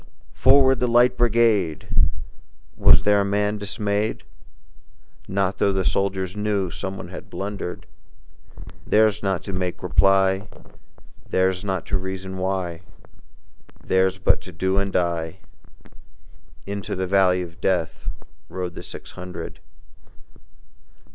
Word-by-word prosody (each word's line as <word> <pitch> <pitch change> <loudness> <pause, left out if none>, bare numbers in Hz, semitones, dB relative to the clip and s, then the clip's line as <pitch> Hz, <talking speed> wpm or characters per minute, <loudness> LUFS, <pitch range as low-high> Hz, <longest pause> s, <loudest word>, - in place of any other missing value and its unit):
"Forward, 135 -1 +5
the 125 - +1
Light 120 +1 +4
Brigade!" 115 -8 +2 0.9
Was - - +6
there 105 0 +4
a - - +2
man 105 +1 0
dismayed? 105 +1 -2 1.0
Not 95 0 -1
tho' 100 - +3
the 95 -1 -1
soldiers 95 -1 0
knew 105 -3 -1
Someone 95 0 -6
had 90 - -9
blundered: 100 -2 -5 1.0
Theirs 110 -1 +4
was - - -16
not 95 -4 0
to 100 - -6
make 90 -1 -3
reply, 95 +1 +3 0.8
Theirs 95 0 +2
was 90 - -9
not 95 -3 -2
to 95 - -1
reason 95 0 -5
why, 95 -3 -2 1.0
Theirs 95 0 +2
was 95 - -19
but - - +3
to 95 - -10
do 95 +3 0
and 100 0 -1
die: 85 -1 -1 1.3
Into 100 0 -4
the 95 0 -1
valley 90 -1 +3
of 85 -1 -11
Death 90 -4 -1 0.4
Rode 90 -2 -4
the - - -8
six - - -10
hundred. 90 -1 -8
95 Hz, 130 wpm, -23 LUFS, 95-105 Hz, 1.3 s, Was